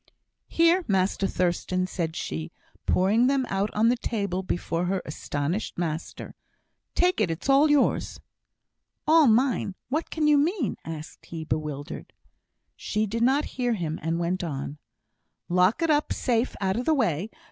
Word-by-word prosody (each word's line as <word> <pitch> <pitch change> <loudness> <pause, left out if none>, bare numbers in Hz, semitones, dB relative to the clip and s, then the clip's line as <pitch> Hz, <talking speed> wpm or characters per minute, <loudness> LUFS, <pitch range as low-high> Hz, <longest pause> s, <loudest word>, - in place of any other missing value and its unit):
"Here, 335 +3 +3
Master 195 -1 +1
Thurstan," 185 0 0
said 170 -3 -3
she, 80 0 -4 0.4
pouring 210 +7 +3
them 270 -1 +2
out 195 +2 0
on 220 +2 +4
the 245 - +3
table 200 -6 -2
before 175 -1 -2
her 190 +1 0
astonished 150 +5 -3
master. 165 -1 -4 0.6
"Take 360 -8 +2
it, 195 - +2
it's 165 +7 -4
all 280 +3 +5
yours." 295 -2 +2 0.9
"All 315 -1 +6
mine! 230 -4 +2
What 310 +5 -1
can 310 -2 0
you 295 -1 +5
mean?" 310 - 0
asked 160 -1 -8
he, 165 -1 -6
bewildered. 150 -1 -4 0.6
She 215 +1 -1
did 225 +3 -3
not 270 +5 +3 0.2
hear 245 -1 +2
him, 165 -5 -3
and 165 +1 -1
went 175 +2 -1
on: 145 -2 -5 0.7
"Lock 180 - +3
it 330 - +3
up 295 0 +1
safe, 240 -1 0
out 190 +1 0
o' - - 0
the 310 +5 +2
way. 200 - 0
195 Hz, 155 wpm, -26 LUFS, 170-265 Hz, 0.9 s, All